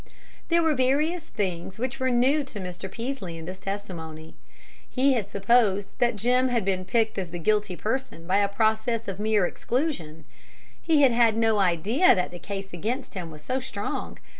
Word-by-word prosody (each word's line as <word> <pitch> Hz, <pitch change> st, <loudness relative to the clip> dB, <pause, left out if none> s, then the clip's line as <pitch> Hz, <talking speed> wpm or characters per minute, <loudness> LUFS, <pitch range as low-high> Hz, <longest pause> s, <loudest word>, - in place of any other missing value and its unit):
There 340 Hz, 0 st, +4 dB
were 320 Hz, -1 st, +3 dB
various 300 Hz, +6 st, +1 dB
things 185 Hz, -3 st, -3 dB
which 255 Hz, +3 st, -3 dB
were 260 Hz, 0 st, +1 dB
new 260 Hz, +5 st, +3 dB
to 225 Hz, -6 st, -7 dB
Mr. 180 Hz, 0 st, -6 dB
Peaslee 230 Hz, -8 st, -5 dB
in 165 Hz, -, -8 dB
this 185 Hz, +2 st, -7 dB
testimony. 165 Hz, -6 st, -6 dB, 0.6 s
He 270 Hz, +1 st, +3 dB
had 225 Hz, -6 st, -1 dB
supposed 200 Hz, -1 st, +2 dB
that 240 Hz, -2 st, +2 dB
Jim 250 Hz, +5 st, +2 dB
had 235 Hz, -5 st, 0 dB
been 185 Hz, -1 st, 0 dB
picked 220 Hz, +1 st, +1 dB
as 180 Hz, -3 st, -4 dB
the 175 Hz, -, -5 dB
guilty 210 Hz, +2 st, +1 dB
person 215 Hz, -, -3 dB
by 185 Hz, +3 st, +2 dB
a 200 Hz, 0 st, +3 dB
process 220 Hz, +2 st, 0 dB
of 195 Hz, 0 st, -4 dB
mere 210 Hz, -2 st, +2 dB
exclusion; 175 Hz, -, -3 dB, 0.6 s
he 310 Hz, -3 st, +3 dB
had 265 Hz, -, +6 dB
had 230 Hz, -2 st, +3 dB
no 225 Hz, -2 st, +3 dB
idea 200 Hz, -, +4 dB
that 180 Hz, -2 st, -1 dB
the 175 Hz, -, -8 dB
case 195 Hz, -1 st, -6 dB
against 225 Hz, -, -3 dB
him 180 Hz, -5 st, -5 dB
was 150 Hz, -1 st, -12 dB
so 260 Hz, +1 st, -1 dB
strong. 215 Hz, -6 st, -5 dB
215 Hz, 185 wpm, -26 LUFS, 185-255 Hz, 0.6 s, had